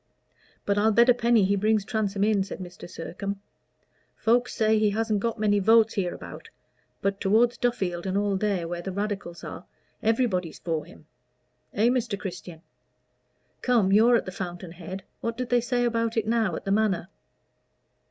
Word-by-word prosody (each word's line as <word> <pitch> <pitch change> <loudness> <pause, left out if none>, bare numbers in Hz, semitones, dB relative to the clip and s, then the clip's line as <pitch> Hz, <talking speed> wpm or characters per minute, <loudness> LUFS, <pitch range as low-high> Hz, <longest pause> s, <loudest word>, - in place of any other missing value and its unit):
"But 200 0 +1
I'll 220 +2 +4
bet 235 +3 +5
a - - +8
penny 235 -3 +3
he 200 +1 +2
brings 210 0 +1
Transome 205 -2 -1
in," 210 -2 +3
said 195 - -7
Mr. 180 -1 -10
Sircome. 195 +3 -5 0.8
"Folks 245 +2 +1
say 220 0 +3
he 215 -1 +3
hasn't 215 0 0
got 230 +2 -2
many 210 -1 +2
votes 225 +2 +5
hereabout; 180 -3 -5 0.5
but 200 0 -1
toward 230 +5 +3
Duffield, 190 -8 -1
and 190 +1 0
all 205 -1 +1
there, 190 -4 -1
where 175 0 -4
the 190 - -5
Radicals 200 -3 -4
are, - - -8 0.3
everybody's 215 -7 0
for 160 -3 -3
him. - - -16 0.7
Eh, 220 +4 +2
Mr. 245 -5 0
Christian? 180 -4 -8 1.0
Come 230 -6 +2
you're 225 +4 +6
at - - +1
the 185 - -5
fountain 180 -1 -6
head 185 +2 -8 0.2
what 230 0 -3
do 250 - -2
they 245 0 +2
say 245 +1 0
about 230 -1 0
it 220 - +1
now 225 -3 +1
at - - -7
the 195 - -1
Manor?" 200 -4 +1
205 Hz, 170 wpm, -26 LUFS, 190-230 Hz, 1.0 s, a